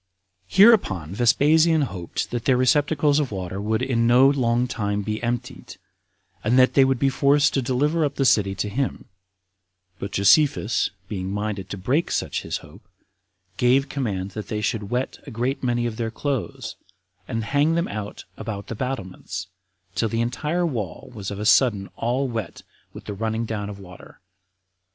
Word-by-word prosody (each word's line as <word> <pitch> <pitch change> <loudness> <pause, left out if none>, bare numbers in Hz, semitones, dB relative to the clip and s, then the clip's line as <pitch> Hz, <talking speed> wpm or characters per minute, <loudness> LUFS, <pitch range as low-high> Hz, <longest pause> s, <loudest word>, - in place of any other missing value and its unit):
13. 195 - +6
Hereupon 95 - +3
Vespasian 155 +8 +4
hoped 90 -9 -4
that 120 -1 -3
their 130 -2 +4
receptacles 145 +2 +3
of 145 -6 -1
water 95 0 -4
would 110 +3 0
in 115 -3 +1
no 125 +3 +6
long 125 -3 +2
time 105 -4 -2
be 105 +1 -3
emptied, 120 0 -4 0.7
and 120 +4 +2
that 130 0 +5
they 135 - +6
would 135 -1 +2
be 135 - +2
forced 140 +2 +3
to 135 - +1
deliver 145 +6 +1
up 145 -1 -1
the 135 - +1
city 100 -5 +3
to 105 - -2
him; 130 +6 -3 0.9
but 100 - -5
Josephus 120 +3 +3 0.2
being 95 -1 -4
minded 100 -2 -3
to 100 - -5
break 130 - 0
such - - -1
his - - -3
hope, - - -15 0.8
gave 130 +3 +3
command 100 -8 -3
that 105 0 -6
they 105 - -3
should 110 -1 -2
wet 125 +2 -2
a - - -5
great 125 +5 -2
many 120 -1 0
of 115 -2 -3
their 115 -1 -2
clothes, 135 +2 -4 0.5
and 115 0 -2
hang 145 +6 +2
them 170 +2 0
out 105 -1 -6
about 100 -3 -5
the - - -3
battlements, 95 -7 -5 0.4
till 110 +4 0
the 115 - -2
entire 150 +9 -1
wall 110 - -4
was 100 -4 -5
of 100 - -5
a 105 - -3
sudden 105 -5 +3
all 125 +4 0
wet 115 -7 -5 0.3
with - - -11
the 105 - -5
running 110 +2 -2
down 105 -2 -4
of 100 - -7
the 100 - -12
water. 90 -1 -14
120 Hz, 180 wpm, -23 LUFS, 105-135 Hz, 0.9 s, 13